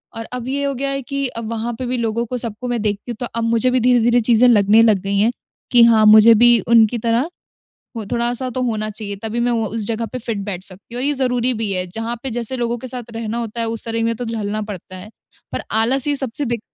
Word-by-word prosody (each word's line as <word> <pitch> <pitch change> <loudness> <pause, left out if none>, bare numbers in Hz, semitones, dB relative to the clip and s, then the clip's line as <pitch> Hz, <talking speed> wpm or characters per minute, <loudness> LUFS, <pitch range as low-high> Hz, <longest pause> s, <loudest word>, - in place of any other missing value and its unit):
और 225 0 -5
अब 250 -1 -5
ये 280 +2 -2
हो 280 0 -1
गया 275 +2 -2
है 275 0 -2
कि 275 0 -3 0.2
वहाँ 230 +1 -3
पे 255 - -3
भी 250 +1 -2
लोगों 230 0 -1
को 250 +2 -4
सबको 230 +1 -4
मैं 240 -3 -2
देखती 210 +2 -3
हूँ - - -5
तो 245 - -2
अब 230 - -1
मुझे 230 +2 +2
भी 255 - +2
धीरे-धीरे 240 0 +3
चीज़ें 235 +2 +4
लगने 215 0 +5
लग 215 -4 +4
गई 200 +1 -2
हैं 225 +4 +3 0.4
कि 240 -1 +7
हाँ, 225 -2 +5
मुझे 215 +2 +8
भी 240 +1 +6
उनकी 230 0 +4
तरह 235 +6 0 0.7
वो 225 - -4
थोड़ा-सा 240 +2 -1
तो 255 +1 -3
होना 215 -3 -2
चाहिए 205 -1 -6
तभी 225 +1 -3
मैं 240 0 +1
वो 225 -2 0
उस 220 +1 -4
जगह 230 +1 -2
पे 255 - -4
फिट 230 -2 -4
बैठ 185 -3 -5
सकती 195 +5 -11
हूँ। 245 - -3
और 270 - -1
ये 295 - +1
ज़रूरी 250 -2 0
भी 220 -2 -3
है। 185 -1 -2
जहाँ 225 +6 -5
पे 270 - -4
जैसे 240 +2 -1
लोगों 240 0 -2
के 255 - -8
साथ 245 -2 -6
रहना 225 0 -4
होता 235 0 -5
है 230 - -1
उस 225 -1 -3
तरह 230 0 -2
में 230 0 0
तो 245 - -5
ढलना 215 -2 -3
पड़ता 185 -1 -9
है। 185 +3 -11 0.4
पर - - -3 0.2
आलस 265 +4 +2
ये 290 - +1
सबसे 270 +2 -2
बिग 235 -3 -2
230 Hz, 260 wpm, -19 LUFS, 220-245 Hz, 0.7 s, मुझे